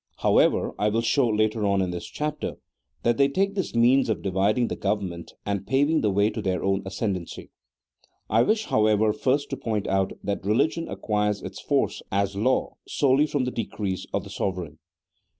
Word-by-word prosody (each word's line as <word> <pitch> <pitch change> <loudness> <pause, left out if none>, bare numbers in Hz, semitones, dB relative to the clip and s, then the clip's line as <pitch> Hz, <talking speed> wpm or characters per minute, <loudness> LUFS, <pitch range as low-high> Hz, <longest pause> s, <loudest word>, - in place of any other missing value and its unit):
However, - - +3
I 105 - +2
will 115 +2 0
show 130 +2 +3
later 110 0 +1
on 100 -1 +2
in 95 -1 0
this 85 -1 -5
chapter 150 0 -3 0.5
that 120 -1 +2
they 140 - +5
take 195 +8 0
this 190 - -3
means 125 +2 +4
of 90 -7 -1
dividing 100 +5 +1
the - - -3
go 100 +1 +1
vernment, 90 -5 -7
and 100 -1 -2
paving 145 +4 +2
the 105 - +2
way 100 +2 +2
to 110 - -4
their 95 -2 -1
own 95 0 +1
ascendency. 95 -3 -4 0.8
I 110 +2 +3
wish, 215 - +2
however, 110 0 +3
first 135 +6 0
to 135 - -2
point 110 -5 -2
out 95 0 0
that 100 0 -2
religion 155 - +1
acquires 105 -1 -1
its - - -7
force - - 0
as 100 0 0
law 125 +6 0
solely 140 +2 +3
from 145 -3 -1
the 125 - -2
decrees 100 -5 -3
of - - -1
the - - -10
sovereign. 90 -5 -3
105 Hz, 185 wpm, -25 LUFS, 100-130 Hz, 0.8 s, they